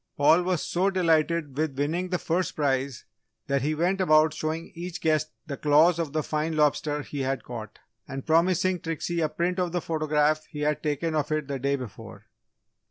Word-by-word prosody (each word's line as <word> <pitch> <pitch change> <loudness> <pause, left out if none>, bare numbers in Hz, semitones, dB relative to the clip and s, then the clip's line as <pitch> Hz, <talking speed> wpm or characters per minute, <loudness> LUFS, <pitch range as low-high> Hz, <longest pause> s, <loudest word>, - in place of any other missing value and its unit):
Paul 160 +4 +5
was 180 -2 -1
so 185 +3 +1
delighted 165 -5 +1
with 150 -2 -1
winning 165 +6 -1
the 180 - 0
first 175 +2 -1
prize 135 -4 -1 0.4
that 140 -1 0
he 150 +4 0
went 180 +5 +1
about 155 -3 +4
showing 155 +1 -4
each 170 0 -6
guest 155 -1 +1 0.2
the 140 -4 -5
claws 155 +4 +4
of 160 -4 -2
the 155 0 -1
fine 155 +2 -2
lobster 150 0 +1
he 145 - -6
had 135 0 -1
caught 115 -3 -8 0.3
and 135 0 -6
promising 180 +2 +2
Trixie 165 +1 -3
a 155 - +1
print 180 +4 -1
of 180 -2 -1
the 175 - +1
photograph 155 -1 +1
he 150 - -7
had 150 0 0
taken 155 +2 -1
of 150 -1 -1
it 155 -2 -1
the 140 -1 -3
day 140 +2 +1
before. 110 -4 -9
155 Hz, 190 wpm, -26 LUFS, 145-170 Hz, 0.4 s, Paul